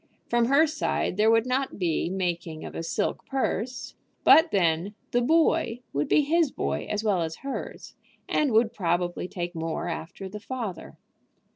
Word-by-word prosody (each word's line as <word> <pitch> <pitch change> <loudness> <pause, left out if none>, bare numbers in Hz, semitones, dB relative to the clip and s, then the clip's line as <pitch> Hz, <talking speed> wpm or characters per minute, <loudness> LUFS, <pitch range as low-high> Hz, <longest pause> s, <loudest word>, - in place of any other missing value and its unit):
From 240 0 +3
her 280 +6 +5
side 310 - -1
there 215 +3 +4
would 225 +1 +4
not 260 +2 -1
be 170 -3 0
making 175 -4 -3
of - - -8
a - - -4
silk 165 +5 -2
purse; 255 -2 -2 0.3
but 320 +1 +7
then 180 - +1 0.2
"the 245 - +2
boy" 315 -3 +2
would 145 +1 0
be - - +4
his 310 0 +2
boy - - -2
as 210 +1 -1
well 200 -5 +2
as 160 -1 -3
hers, 275 - -6 0.3
and 295 -4 +1
would 225 +1 +3
probably 175 -2 -1
take 175 -1 -5
more 165 0 -3
after 170 +3 -6
the 210 +3 -7
father. 225 -6 -6
210 Hz, 165 wpm, -26 LUFS, 175-255 Hz, 0.3 s, but